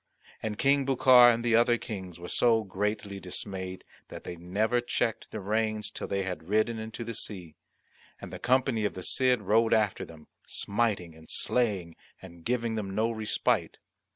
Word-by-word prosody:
And 105 -1 -3
King 140 +2 +3
Bucar 130 -2 +7
and 115 0 -2
the 115 -1 +3
other 120 +1 +4
Kings 95 -7 -7
were 90 - -7
so 115 +1 +3
greatly 100 0 -3
dismayed 95 0 -6 0.2
that - - -9
they 85 - -6
never 105 +8 0
checked 120 -2 -2
the 110 - -6
reins 110 +1 -1
till - - -5
they 100 0 -1
had 90 -3 -6
ridden 110 +2 +1
into 110 +2 -6
the 115 0 -5
sea; 90 -7 -5 0.7
and - - -9
the - - -6
company 125 -3 +2
of 105 - -1
the 95 - -6
Cid 125 -1 +2
rode 110 +3 +3
after 105 -3 +1
them, 80 -2 -12 0.2
smiting 100 -6 -1
and 80 0 -16
slaying 100 -9 0 0.2
and 85 -3 -13
giving 120 0 -1
them, 100 -3 -4
no 110 +2 +1
respite. 110 -1 0
110 Hz, 175 wpm, -29 LUFS, 95-115 Hz, 0.7 s, Bucar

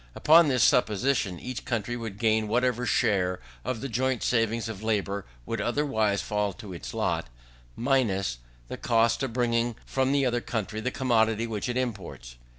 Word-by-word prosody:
Upon 165 +1 +6
this 130 -4 +3
supposition, 110 -5 +2
each 130 -1 -6
country 120 0 -2
would 115 -4 -6
gain 110 0 +2
whatever 125 +2 +1
share 90 -5 +1 0.2
of 115 -3 -3
the 135 - -3
joint 130 +1 0
saving 115 -1 +1
of 110 -3 -6
labour 100 -3 -1 0.2
would 115 -2 -3
otherwise 110 -5 0
fall 105 -1 -1
to 105 -3 -9
its 60 -8 -7
lot, - - -1 0.5
minus 105 - +1 0.3
the - - -6
cost 115 +1 +2
of 135 -3 -1
bringing 120 -1 0
from 130 0 0
the 140 -1 +2
other 120 -1 0
country 110 -2 -3
the 125 - -1
commodity 115 -3 +1
which 110 0 -3
it 120 - -1
imports. 95 - -5
115 Hz, 165 wpm, -27 LUFS, 105-125 Hz, 0.5 s, Upon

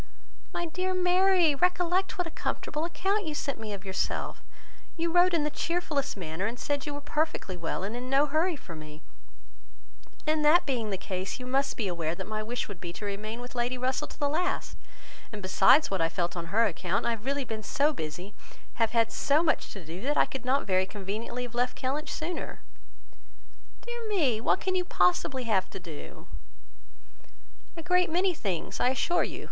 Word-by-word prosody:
"My 345 - -2
dear 370 +3 -1
Mary, 365 -2 +4
recollect 360 +4 +1
what 360 - 0
a 330 - -6
comfortable 305 +1 -2
account 385 +3 0
you 305 - -2
sent 280 -4 -2
me 220 -1 -5
of 200 -1 -6
yourself! 190 -1 -2 0.5
You 335 0 0
wrote 355 +1 +6
in 330 -4 +2
the 300 - 0
cheerfullest 310 -7 -1
manner, 175 +2 -2
and 235 +2 -5
said 285 0 -1
you 290 - -3
were 290 - -5
perfectly 300 - -1
well, 170 +1 -3
and 210 +4 -3
in 250 +1 -5
no 275 +2 +5
hurry 315 +4 +1
for 180 - -10
me; 155 0 -10 1.2
and 310 0 +2
that 315 +4 +6
being 240 -6 -1
the 195 - -1
case, 185 +4 -4
you 250 - -6
must 270 +2 +1
be 215 - 0
aware 170 -2 -1
that 190 - -5
my 215 +2 -3
wish 240 +3 -3
would 195 -5 -9
be 175 - -4
to 205 - -6
remain 215 +3 -4
with 245 - -8
Lady 245 +1 0
Russell 260 +4 0
to - - -12
the 290 - +1
last: 345 +6 -1 0.6
and 210 - -6
besides 195 +9 +5
what 190 -3 +1
I 165 - +3
felt 175 0 -1
on 170 -1 -4
her 220 +6 +3
account, 180 0 0
I - - +3
have 225 -2 -4
really 280 0 0
been 220 -2 -4
so 285 +8 +2
busy, 175 - -5 0.5
have 225 0 +3
had 230 -1 +3
so 295 +3 +3
much 320 - +1
to 195 -5 -9
do, 165 +4 -7
that 290 +4 0
I - - +6
could 265 -2 -6
not 270 +2 +2
very 185 -1 +2
conveniently 210 +5 -4
have 245 -1 -7
left 245 +1 0
Kellynch 290 +4 -1
sooner." 335 +3 -4 1.2
"Dear 475 -1 -5
me! 280 - +2
what 305 - +2
can 375 - 0
you 365 -1 +2
possibly 255 - +2
have 200 -5 +1
to - - -7
do?" 165 -5 -9 1.5
"A 330 - -5
great 360 +1 +3
many 360 +3 +2
things, 195 - -3
I 250 - +4
assure 345 +7 +2
you. - - -4
255 Hz, 200 wpm, -29 LUFS, 195-320 Hz, 1.5 s, wrote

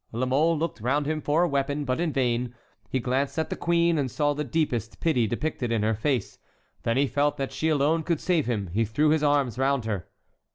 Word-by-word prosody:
La 120 +3 -1
Mole 155 +6 +2
looked 165 -7 -3
round 140 +5 +1
him 155 +1 -1
for 150 +4 +2
a - - +3
weapon, 140 0 -1
but 130 +1 -1
in 170 -2 0
vain; 125 -2 0 0.3
he 130 - 0
glanced 130 +5 -1
at 160 - -1
the - - -1
queen, 170 -1 +2
and 135 -2 0
saw 145 +3 +1
the 150 +1 -3
deepest 140 - -2
pity 125 -9 +2
depicted 120 0 -2
in 110 -2 +1
her 110 +1 +2
face; 120 +1 -2 0.4
then 115 +2 0
he 140 - +4
felt 145 +1 0
that 135 -1 -3
she 160 - -1
alone 155 +2 +2
could 165 -1 -1
save 170 -7 +1
him; 100 -7 -2
he 115 +3 +2
threw 145 +8 +1
his 155 0 +3
arms 140 -5 +1
round 135 -2 +1
her. 100 -6 -3
140 Hz, 230 wpm, -26 LUFS, 120-155 Hz, 0.4 s, he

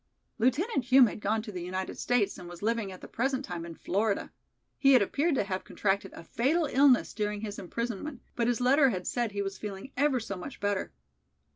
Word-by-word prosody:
"Lieutenant 270 - +1
Hume 255 +1 +7
had 220 - -3
gone 215 +1 0
to 220 - -7
the 180 -3 -5
United 185 +2 -4
States 220 -5 0
and 175 -1 -9
was 175 +2 -10
living 225 -3 0
at 185 - -11
the - - -9
present 265 +3 -1
time 170 -2 -5
in 165 - -8
Florida. 200 +4 -1 0.5
He 275 -1 +6
had 255 - +7
appeared 290 - +1
to - - +2
have 190 -1 -3
contracted 200 0 -1
a - - -10
fatal 295 - +1
illness 270 -3 +4
during 210 -1 -2
his 205 -2 -5
imprisonment, 235 - -4
but 235 -1 +1
his 245 0 +1
letter 270 +3 +5
had 185 -6 -3
said 240 -3 -1
he 200 0 -2
was 195 0 -5
feeling 205 +5 -7
ever 275 -1 +2
so 220 -3 -5
much 190 +9 -8
better. 205 -1 -1
220 Hz, 215 wpm, -29 LUFS, 195-260 Hz, 0.5 s, Hume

